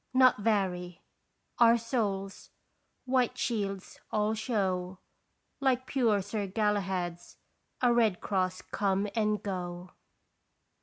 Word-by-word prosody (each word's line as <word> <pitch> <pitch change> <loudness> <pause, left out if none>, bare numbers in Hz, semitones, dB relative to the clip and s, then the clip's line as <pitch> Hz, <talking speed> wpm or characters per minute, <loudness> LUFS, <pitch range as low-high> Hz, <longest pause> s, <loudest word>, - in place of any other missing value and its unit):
" - - -45
Nor 255 -1 +7
vary 185 -5 -1 0.6
Our 235 0 +7
souls, 210 -5 -3 0.6
white 255 -1 +1
shields, 200 -6 -3
all 210 0 +1
show 190 -5 -1 0.6
Like 260 -2 +1
pure 225 -7 +2
Sir 205 0 -3
Galahed's 190 -4 -2 0.5
A 245 -1 +5
red 225 -6 +3
cross 185 -2 -1
come 200 0 0
and 210 -2 +1
go. 180 -2 -5
205 Hz, 105 wpm, -30 LUFS, 185-230 Hz, 0.6 s, Nor